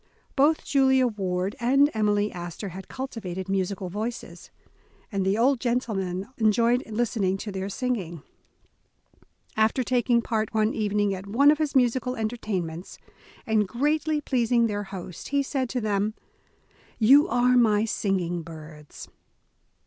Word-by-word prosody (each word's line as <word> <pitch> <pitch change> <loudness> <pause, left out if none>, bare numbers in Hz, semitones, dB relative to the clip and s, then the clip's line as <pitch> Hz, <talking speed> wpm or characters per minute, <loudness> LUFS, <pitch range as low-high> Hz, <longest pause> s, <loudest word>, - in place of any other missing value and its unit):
Both 295 +3 +3
Julia 265 -2 +3
Ward 190 -3 -2
and 275 +5 +3
Emily 210 -1 +1
Astor 175 +3 -6
had 185 +1 -9
cultivated 200 -9 -6
musical 195 0 -2
voices, 220 +6 -6 0.6
and 200 -2 -1
the 195 +2 +1
old 255 +3 +3
gentleman 205 -7 -2
enjoyed 230 +3 +3
listening 215 -4 0
to 205 +1 -6
their 190 0 -4
singing. 195 - -3 1.3
After 220 +4 +2
taking 240 -1 +2
part 220 -1 -2
one 215 0 +2
evening 205 -1 0
at 190 +1 -7
one 275 +8 +5
of 305 - 0
his 300 -2 -1
musical 250 0 +2
entertainments, 200 -7 -4 0.5
and 215 -2 +1
greatly 300 +7 0
pleasing 240 -3 +2
their 205 -2 -2
host, 185 -3 -8
he 280 0 +1
said 265 -2 -2
to 250 - -2
them: 210 0 -1 0.8
''You 280 - +6
are 250 -2 +3
my 220 -3 +4
singing 185 -5 -1
birds. 155 -2 -11
215 Hz, 135 wpm, -26 LUFS, 195-250 Hz, 1.3 s, You